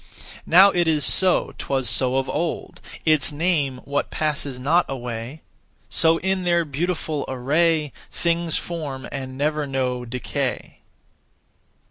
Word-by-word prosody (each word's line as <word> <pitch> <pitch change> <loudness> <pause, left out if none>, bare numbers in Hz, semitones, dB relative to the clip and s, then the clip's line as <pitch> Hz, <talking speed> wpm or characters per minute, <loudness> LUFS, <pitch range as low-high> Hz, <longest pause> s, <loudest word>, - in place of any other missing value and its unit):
Now 190 +4 +7
it 175 -1 +1
is 150 -3 +3
so; 185 -1 +3
'twas 135 -2 -1
so 125 +4 +1
of 135 0 0
old. 170 -1 -3 0.2
Its 155 -2 +3
name 145 -5 0
what 140 0 -1
passes 145 -4 -2
not 160 +7 +3
away; 125 +2 -5 0.5
So, 165 0 +3
in 190 0 0
their 170 -1 +2
beautiful 155 0 -2
array, 150 +4 +1 0.2
Things 170 -1 0
form 150 -6 -5
and 130 -1 -6
never 150 +1 0
know 130 -2 -1
decay. 125 0 -4
150 Hz, 125 wpm, -23 LUFS, 130-170 Hz, 0.5 s, Now